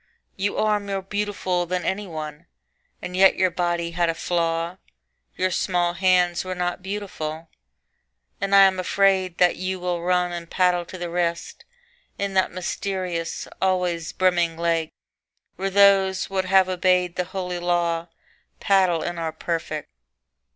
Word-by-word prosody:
You 200 +1 -2
are 215 -1 +2
more 200 -1 -4
beautiful 195 -3 -2
than 180 0 -2
any 200 +1 -2
one, 155 -3 -7 0.6
And 180 - -5
yet 190 +1 +6
your 185 -1 +2
body 170 -1 -1
had 170 0 +1
a 165 - -1
flaw: 165 +1 -1 0.6
Your 185 0 +1
small 175 -1 0
hands 180 -1 +2
were 185 0 -4
not 180 0 -2
beautiful, 170 -5 -5 0.9
And 200 0 +2
I 195 - +9
am 190 -1 +4
afraid 190 -1 +2
that 180 -1 +3
you 185 0 -3
will 175 -1 -2
run 180 0 +1
And 170 -1 -6
paddle 180 -2 +2
to 185 - -9
the 175 -1 -5
wrist 170 -1 -2 0.5
In 200 -1 -2
that 190 -1 +3
mysterious, 180 -1 -3
always 180 -3 0
brimming 175 -3 +1
lake 165 -1 0 0.6
Where 195 +2 -2
those 195 -1 +4
that 190 -1 -1
have 190 0 +4
obeyed 180 -1 +1
the 180 - -1
holy 180 -1 -4
law 170 -1 0 0.5
Paddle 185 -5 +3
and 175 -1 -4
are 165 -1 -2
perfect. 160 -2 -4
180 Hz, 150 wpm, -23 LUFS, 170-190 Hz, 0.9 s, I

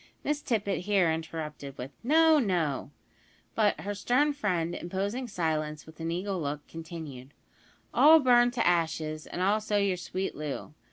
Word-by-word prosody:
Miss 295 0 -1
Tippet 205 -4 -1
here 195 -5 +3
interrupted 160 -3 -5
with, 125 +3 -6
"No, 315 +4 +5
no;" 175 - 0 0.6
but 210 -2 +2
her 205 - -3
stern 255 +8 +2
friend 180 - -1
imposing 200 +9 -3
silence, 155 -6 -2
with 160 +1 -15
an 165 0 -3
eagle 185 +2 -2
look, 145 0 -4
continued: 160 -5 -9 0.6
"All 320 +2 +8
burned 245 -3 +4
to 235 - 0
ashes, 160 -3 0
and 180 - -3
also 210 +1 +1
your 200 -2 +1
sweet 185 +2 -3
Loo. 150 0 -5
180 Hz, 150 wpm, -29 LUFS, 160-215 Hz, 0.6 s, All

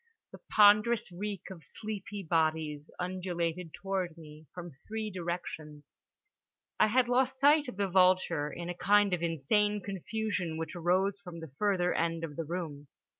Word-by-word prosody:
The - - -11
ponderous 210 +1 +5
reek 195 +1 -5
of 170 -4 -10
sleepy 205 -2 -6
bodies 155 -2 0
undulated 180 -2 -3
toward 185 -2 -3
me 155 -1 -13
from 175 -1 -8 0.2
three 220 -1 -3
directions. 165 -5 -6 0.8
I - - +6
had 245 +3 +3
lost 260 +1 +1
sight 290 +1 +5
of 225 - -7
the 200 -1 +1
vulture 180 -5 +3
in 170 0 -6
a 175 - -3
kind 205 +2 +3
of 175 - 0
insane 190 +6 +1
confusion 200 -3 -3
which 160 +2 -5
arose 185 +3 +1
from 180 -4 -9
the 160 -4 -9
further 190 -4 +2
end 165 0 -1
of 150 -3 -5
the 165 - -3
room. 155 -4 -5
180 Hz, 155 wpm, -31 LUFS, 165-205 Hz, 0.8 s, I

